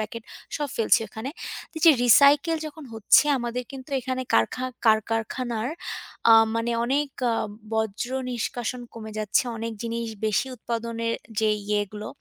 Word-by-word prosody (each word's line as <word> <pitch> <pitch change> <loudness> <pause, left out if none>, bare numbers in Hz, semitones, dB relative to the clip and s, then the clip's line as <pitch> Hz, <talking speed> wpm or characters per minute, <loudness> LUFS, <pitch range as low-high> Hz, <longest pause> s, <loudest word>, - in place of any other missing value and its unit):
Packet 215 +1 -5 0.3
সব 295 -1 -2
ফেলছি 225 - +4
ওখানে। 220 +6 -6 0.4
তো - - -22
যে 330 - +10
রিসাইকেল 280 +7 +6
যখন 305 0 -9
হচ্ছে 220 +6 +5
আমাদের 240 +1 -3
কিন্তু 270 +1 -9
এখানে 255 +1 -3
কারখা 115 - +2 0.2
কার 220 -1 +6
কারখানার 225 +1 -2 0.6
আ - - +10 0.2
মানে 230 +1 0
অনেক 280 +3 +1 0.2
আ - - +1 0.4
বজ্র 220 +2 -1 0.2
নিষ্কাশন 245 +1 -3
কমে 220 -1 -8
যাচ্ছে। 215 +2 +2
অনেক 230 +1 -4
জিনিস 230 0 -3 0.2
বেশি 215 +5 +1
উৎপাদনে 230 0 -3 0.3
যেই 215 -1 +2
ইয়েগুলো 210 0 -2
230 Hz, 145 wpm, -25 LUFS, 220-255 Hz, 0.6 s, যে